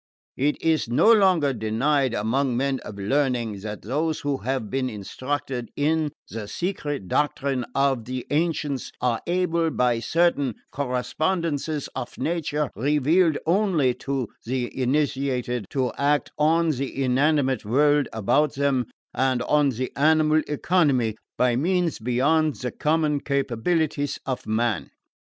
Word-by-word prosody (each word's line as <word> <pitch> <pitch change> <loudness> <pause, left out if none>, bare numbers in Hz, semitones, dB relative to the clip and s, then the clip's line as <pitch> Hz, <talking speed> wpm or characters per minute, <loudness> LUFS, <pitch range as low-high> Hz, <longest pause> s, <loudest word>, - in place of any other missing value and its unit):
It 145 +3 +1
is 160 -7 +1
no 215 - +5
longer 185 -10 +4
denied 125 +4 +1
among 120 +4 0
men 135 0 0
of 100 - -9
learning 120 -1 0
that 105 +1 -7
those 155 +7 -1
who 145 -1 -1
have 130 -3 -2
been 130 +3 -1
instructed 130 +4 -4
in 155 +1 +1 0.2
the 110 -2 -6
secret 145 - -3
doctrine 135 0 0
of 135 -4 +1
the 130 0 -4
ancients 150 -3 -1
are 120 -3 0
able, 170 -2 +1
by 125 -5 +1
certain 145 -2 +1 0.2
correspondences 145 +4 -1
of 120 - -6
nature, 150 -1 -1
revealed 150 - +2
only 170 -7 +2
to 135 -4 -2
the 125 0 -3
initiated, 130 -4 -1
to 130 -3 -1
act 145 +1 +1
on 165 +2 +3
the 135 0 -3
inanimate 135 +1 +2
world 145 +6 +3
about 135 +7 +1
them, 135 -4 +1 0.3
and 130 -2 +1
on 150 -1 +3
the 130 0 -3
animal 155 +1 +4
economy, 145 - +1 0.2
by 125 -1 +3
means 175 +4 0
beyond 140 +6 +2
the 125 -1 -4
common 150 0 +1
capabilities 140 +2 -1
of 130 -1 -4
man." 110 0 0
140 Hz, 130 wpm, -24 LUFS, 125-155 Hz, 0.3 s, no